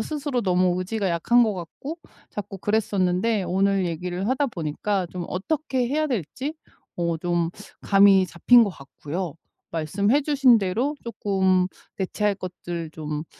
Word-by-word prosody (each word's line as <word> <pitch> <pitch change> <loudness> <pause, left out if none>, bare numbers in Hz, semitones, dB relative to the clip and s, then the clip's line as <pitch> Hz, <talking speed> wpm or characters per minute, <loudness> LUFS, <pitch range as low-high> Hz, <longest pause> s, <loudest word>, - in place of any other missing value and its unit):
스스로 285 0 -2
너무 180 -1 +2
의지가 195 +1 -1
약한 235 +9 +3
것 215 -3 +1
같고 270 - -7 0.3
자꾸 205 -1 -6
그랬었는데 205 0 +1
오늘 195 +2 +1
얘기를 180 +4 -3
하다 270 +2 +1
보니까 180 - -2
좀 180 -2 -5
어떻게 255 +4 -1
해야 310 +3 +1
될지 260 - -3 0.4
어 170 -1 0
좀 175 -1 0 0.3
감이 195 -1 +5
잡힌 235 +8 +5
것 205 - +1
같고요. 155 +3 -6 0.4
말씀해 200 - +1
주신 270 -5 +5
대로 225 +10 -1
쪼끔 190 -5 +1 0.3
대체할 205 +2 0
것들 175 -3 -6
좀 150 0 -4
195 Hz, 280 characters per minute, -24 LUFS, 175-235 Hz, 0.4 s, 감이